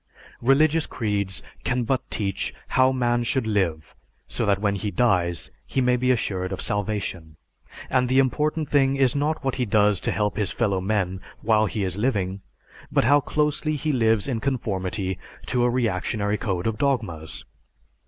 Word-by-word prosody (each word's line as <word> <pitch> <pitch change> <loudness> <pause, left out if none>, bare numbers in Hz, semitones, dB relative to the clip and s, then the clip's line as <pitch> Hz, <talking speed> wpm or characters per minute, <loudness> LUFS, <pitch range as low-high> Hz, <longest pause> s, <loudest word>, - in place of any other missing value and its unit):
Religious 150 +5 +3
creeds 100 -4 -2 0.2
can 125 0 0
but 130 +2 0
teach 100 -3 -2
how 130 0 +4
man 120 -2 +1
should 130 +1 0
live, 95 -8 -1 0.3
so - - -2
that 100 -1 +3
when 100 0 0
he 100 +1 -2
dies, 90 -8 +1 0.2
he - - -1
may 125 -1 +3
be 125 +1 0
assured 95 -6 0
of 95 - -4
salvation; 100 -6 -3 0.5
and 125 -1 +1
the 130 - +2
important 150 +4 +1
thing 135 -1 +3
is 135 -2 +3
not 150 +2 0
what 135 -1 -1
he 125 - +1
does 105 -3 +3
to - - -2
help 105 -1 -1
his 105 -4 +1
fellow 100 -5 0
men 95 -2 -1 0.2
while 110 -1 +3
he 105 0 -2
is 95 0 -2
living, 100 -5 -1 0.5
but - - +3
how 145 +1 +5
closely 150 +1 0
he 150 +1 -1
lives 115 -4 +2
in 125 -5 -1
conformity 100 -7 -2 0.3
to 125 -1 +1
a 125 - +3
reactionary 105 -3 0
code 95 -5 -2
of 110 -1 -1
dogmas. 85 - -2
110 Hz, 170 wpm, -24 LUFS, 95-130 Hz, 0.5 s, how